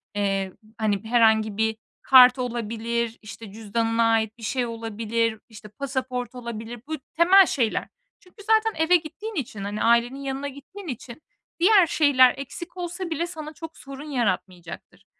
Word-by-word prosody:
eee, 195 -2 -1 0.2
hani, 210 -2 0
herhangi 220 -3 +3
bir 220 0 0 0.2
kart 255 0 +7
olabilir, 235 -1 -3
işte, 215 0 -10
cüzdanına 225 +2 -1
ait 220 0 0
bir 225 - -14
şey 250 +2 -1
olabilir, 230 0 -2
işte, 210 -1 -12
pasaport 255 +1 -4
olabilir. 235 -1 -7
Bu 315 - -3 0.2
temel 370 +4 +7
şeyler. 240 -9 -1 0.3
Çünkü 410 +1 -17
zaten 440 -5 +2
eve 360 +2 +5
gittiğin 370 +7 -4
için 225 - -4
hani 205 +1 -3
ailenin 235 +3 +2
yanına 275 +1 -4
gittiğin 320 +8 -11
için 245 +1 -8 0.4
diğer 375 -1 +6
şeyler 260 -5 +5
eksik 340 +7 -8
olsa 355 0 -5
bile 330 +1 -2
sana 310 -3 -8
çok 325 +1 -10
sorun 275 +2 -10
yaratmayacaktır. 185 -5 -4
240 Hz, 145 wpm, -24 LUFS, 220-310 Hz, 0.4 s, kart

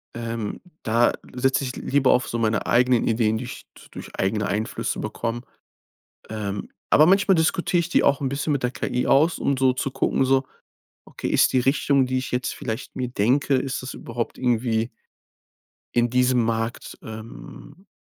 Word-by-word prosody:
ähm. 115 -2 -4 0.2
Da 115 +2 +3 0.2
setze 130 +1 +1
ich 130 -1 -4
l - - -7
lieber 140 -1 +3
auf 125 - +2
so 115 - -3
meine 110 -1 0
eigenen 125 0 +3
Ideen, 110 -1 +2
die 125 - -5
ich - - -9
d - - -15
durch - - -9
eigene 105 +2 0
Einflüsse 105 +3 -2
bekomme. 115 0 -3 0.9
Ähm, 105 -2 -4 0.2
aber 155 - +7
manchmal 195 0 +4
diskutiere 175 +2 +1
ich 170 0 -2
die - - +3
auch 140 0 +3
'n 135 - 0
bisschen 145 +2 -1
mit 135 - -2
der 125 - +1
KI 125 -1 -2
aus, 155 +5 +3
um 140 -1 0
so 130 -1 +3
zu 135 +1 -3
gucken, 135 - +1
so: 135 +1 +3 0.6
Okay, - - -6
ist - - +4
die 130 - +4
Richtung, 135 +1 +2
die 130 0 -1
ich 130 - -6
jetzt 125 0 -1
vielleicht 110 0 -5
mir 125 -1 -3
denke, 130 +5 +2
ist 130 -1 -2
das 130 - -6
überhaupt 115 0 -5
irgendwie 120 -2 0 1.1
in 120 0 +3
diesem 125 -1 +3
Markt, 115 +1 -3
ähm 115 - -11
125 Hz, 180 wpm, -23 LUFS, 115-135 Hz, 1.1 s, aber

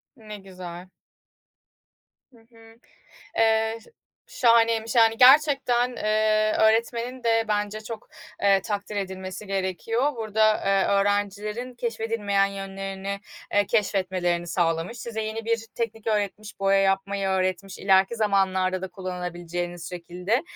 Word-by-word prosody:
Ne 215 -3 -10
güzel. 185 -2 -10 1.4
Hı 235 - -19
hı. 225 0 -19 0.6
Eee, 225 0 +2
ş - - -20 0.5
şahaneymiş, 230 -2 +3
yani. 225 -1 +5
Gerçekten, 255 -2 +5
eee, 215 0 +2
öğretmenin 235 +3 +1
de 225 0 +3
bence 210 0 -1
çok, 220 0 -8 0.3
eee, 195 -1 +4
takdir 205 -1 -4
edilmesi 190 +1 -5
gerekiyor. 195 +8 -1
Burada, 215 -1 +2
eee, 195 -1 +3
öğrencilerin 205 +4 -1
keşfedilmeyen 225 -4 0
yönlerini, 195 0 -5 0.3
eee, 205 0 +3
keşfetmelerini 185 -5 0
sağlamış, 170 +5 -1
size 230 -1 -5
yeni 220 +1 -4
bir 230 0 -1
teknik 225 -1 -4
öğretmiş, 210 -1 -2
boya 195 0 +3
yapmayı 195 0 0
öğretmiş 185 0 -1
ileriki 195 +3 +3
zamanlarda 190 -3 +1
da 190 - -4
kullanabileceğiniz 175 -1 -5
şekilde. 180 - -2
205 Hz, 115 wpm, -25 LUFS, 190-225 Hz, 1.4 s, yani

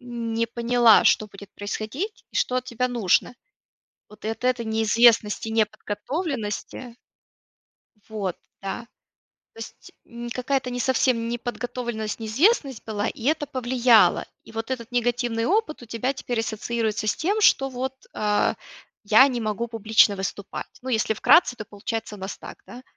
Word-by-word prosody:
не 230 -2 -3
поняла, 235 -1 +4
что 215 - +3
будет 200 +1 -13
происходить, 220 - -5
и - - -5
что 255 - +1
от 255 - -1
тебя 250 0 -2
нужно. 235 -1 +1 0.8
Вот 210 0 -10
и - - 0
от 225 +3 -5
этой 250 -2 +1
неизвестности, 220 0 +3
неподготовленности 225 - -3 1.1
Вот, 200 -5 -3 0.3
да. 210 +4 -5 0.7
То 225 - -14
есть, 225 - -10
м, 235 0 -8
какая-не 250 0 -2
совсем 250 -2 +1
неподготовленность, 240 -2 -4
неизвестность 270 - +1
была, 215 0 -2
и 225 - -6
это 295 +1 +1
повлияло. 245 -3 +3 0.2
И - - -14
вот 225 +2 -5
этот 240 -2 -4
негативный 240 -1 0
опыт 390 - 0
у - - -10
тебя 235 +4 -2
теперь 245 -4 -2
ассоциируется 220 -1 -2
с - - +2
тем, 410 +6 0
что, 270 -8 +4
вот, 260 +1 -4 0.2
а: 210 -1 +1 0.5
"Я 220 +6 +7
не 245 -3 -3
могу 215 +2 -2
публично 220 -2 +3
выступать",- 195 +1 -5
ну 260 - -5
если 220 -2 +1
вкратце, 250 - +5
то 215 - -8
получается 210 +1 -5
у - - -13
нас 190 +1 -6
так, - - -11
да? 250 +1 -11
235 Hz, 150 wpm, -24 LUFS, 220-250 Hz, 1.1 s, Я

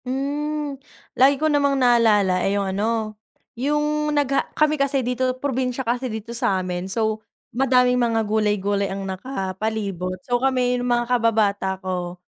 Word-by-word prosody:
Hmm, 285 +2 -3 0.3
lagi 275 +2 +4
ko 310 - -1
namang 285 -2 +2
naalala 220 -7 +3
eh, 195 +2 +1
yung 195 -1 -1
ano 215 +1 -1 0.4
yung 295 +3 0
nagha 285 -2 +1
kami 305 0 +3
kasi 275 -2 +1
dito 255 +1 -1
probinsya 260 -1 -2
kasi 245 +2 -1
dito 220 +1 -6
sa 235 -5 +1
amin 180 0 -3
so 220 +1 -1 0.3
madaming 250 0 +3
mga 225 -2 +1
gulay-gulay 205 -2 0
ang 195 0 -4
nakapalibot. 195 -2 -3
So 245 -2 +1
kami 250 -2 +1
yung 245 - -2
mga 240 0 +2
kababata 215 -5 +1
ko 180 -1 -3
240 Hz, 145 wpm, -22 LUFS, 205-265 Hz, 0.4 s, lagi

